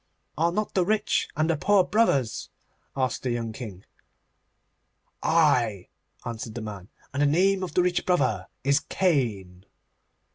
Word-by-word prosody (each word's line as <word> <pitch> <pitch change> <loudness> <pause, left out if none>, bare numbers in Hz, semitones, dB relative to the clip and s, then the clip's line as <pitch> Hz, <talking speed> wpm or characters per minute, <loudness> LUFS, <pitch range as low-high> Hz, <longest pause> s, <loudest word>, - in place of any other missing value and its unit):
'Are 165 +3 +2
not 210 +4 -2
the 185 - +3
rich 210 +3 +1
and 155 +1 +2
the 165 - +2
poor 190 +5 +3
brothers?' 180 - +1 0.5
asked 130 -1 0
the 130 - -2
young 115 -2 -2
King. 105 -6 -8 1.4
'Ay,' 125 - +2 0.4
answered 115 -1 -6
the 120 - -4
man, 105 -3 -8 0.2
'and 140 - -1
the 145 - +4
name 190 +6 +3
of 180 -4 -5
the 180 - +4
rich 180 0 +1
brother 125 - +1 0.2
is 140 +2 +3
Cain. 115 - -1
140 Hz, 145 wpm, -26 LUFS, 115-180 Hz, 1.4 s, the